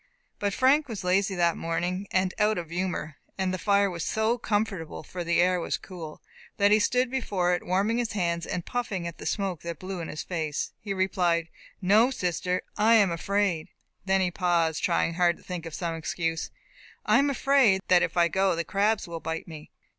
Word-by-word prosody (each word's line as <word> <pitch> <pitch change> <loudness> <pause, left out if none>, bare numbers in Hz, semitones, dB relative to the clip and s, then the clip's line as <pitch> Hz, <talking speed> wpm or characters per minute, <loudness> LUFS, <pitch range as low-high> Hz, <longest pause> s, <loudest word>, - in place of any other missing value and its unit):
But 205 -1 0
Frank 280 +3 +4
was 225 -6 -6
lazy 190 +2 +1
that 170 -1 +2
morning, 180 +4 -2
and 185 0 +1
out 215 0 +3
of 170 -2 -5
humour, 175 -4 -3 0.2
and 190 -1 0
the 185 - -3
fire 200 0 +3
was 170 -3 -4
so 220 +2 0
comfortable 205 -9 -2
(for 175 +3 -6
the 170 0 +1
air 180 +1 +3
was - - -2
cool) 170 -5 -9 0.3
that 205 0 +4
he 215 - +6
stood 250 +3 +1
before 195 -9 0
it, 175 - -1
warming 200 +6 +1
his 235 -4 -2
hands, 170 -4 -1
and 175 - -3
puffing 215 -8 -3
at 170 -1 -6
the - - -5
smoke 195 -5 -2
that 170 -1 -5
blew 185 +1 -6
in 165 - -5
his 155 - -5
face. 160 -5 -3
He 205 - -5
replied, 180 -3 +1 0.3
"No, 215 +6 +5
sister, 180 -5 -1
I 220 +2 +5
am 200 -5 +5
afraid" 180 -1 0 0.4
then 190 0 +2
he 180 -1 +1
paused, 170 -3 +1
trying 165 - +1
hard 175 0 +2
to - - -20
think 175 -3 -6
of 165 - -9
some 170 -2 -2
excuse. 165 0 -2 0.6
"I - - +5
am 285 +1 +3
afraid 265 -7 +3
that 180 -1 +5
if - - -1
I 170 -1 +5
go 190 +1 +1
the 170 - -1
crabs 205 +3 0
will 170 -1 -5
bite 160 +2 -4
me." 155 -2 -10
185 Hz, 205 wpm, -27 LUFS, 170-205 Hz, 0.6 s, he